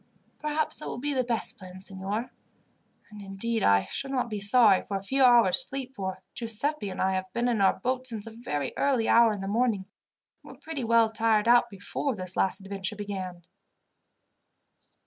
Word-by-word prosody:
"Perhaps 300 +1 -1
that - - -7
will - - -5
be 290 +4 -2
the 260 -2 +1
best 235 -2 0
plan, 185 -1 -11
signor; 195 +5 -4 0.8
and, 210 -1 -10
indeed, 200 +4 -3
I 100 - +4
should 275 - -4
not 250 -3 -2
be 210 - -3
sorry 205 -1 +5
for 200 - -4
a 195 - -8
few 265 +7 +1
hours' 240 -7 +5
sleep, 270 -1 -6
for 190 -2 -5
Giuseppi 230 +1 -1
and 185 - -7
I 190 - +2
have 185 0 -3
been 240 +1 0
in 230 -4 +1
our 190 -1 +3
boat 255 +4 -2
since 225 -4 -4
a 225 - -8
very 150 - -4
early 260 -5 +1
hour 230 -1 +5
in 205 -2 -4
the 195 - -4
morning, 215 -2 0 0.6
and - - -12
were - - -19
pretty 315 -5 -5
well 230 -1 +3
tired 225 -1 +2
out 240 0 +5
before 220 +6 -4
this 185 -2 -5
last 195 +1 +1
adventure 195 +1 -4
began." 190 -4 -6
220 Hz, 190 wpm, -27 LUFS, 195-245 Hz, 0.8 s, sorry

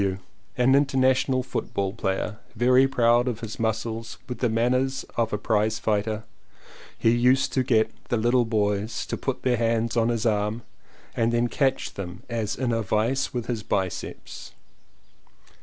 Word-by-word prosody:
W., 95 -1 0 0.4
an 125 +1 +4
international 130 -2 +3
football 100 -5 -3
player, 105 0 -2 0.2
very 125 +3 +5
proud 120 -2 +3
of 115 -3 -2
his 115 -1 -6
muscles 115 +1 -2
and - - -29
with 125 - -5
the 120 - +1
man 115 +2 +1
ners 130 +1 0
of 115 -1 0
a 105 - 0
prizefighter 110 0 0 0.4
— - - -24 0.3
he 115 - +3
used 125 +3 +3
to 130 - +2
get 115 -3 +2 0.2
little 120 +1 +3
boys 105 0 -1
to - - -3
put - - -4
their 125 -2 +2
hands 115 0 0
on 115 0 +2
his 115 -1 -1
arm 105 +1 0 0.5
and 115 0 +1
then 120 +1 +2
catch 135 +2 0
them 90 -2 -7
as 115 -3 -2
in 125 -2 -1
a 115 0 0
vice 115 +6 0
with 120 -2 -3
his 115 -2 -3
biceps. 95 -3 -4
115 Hz, 165 wpm, -25 LUFS, 110-125 Hz, 0.5 s, very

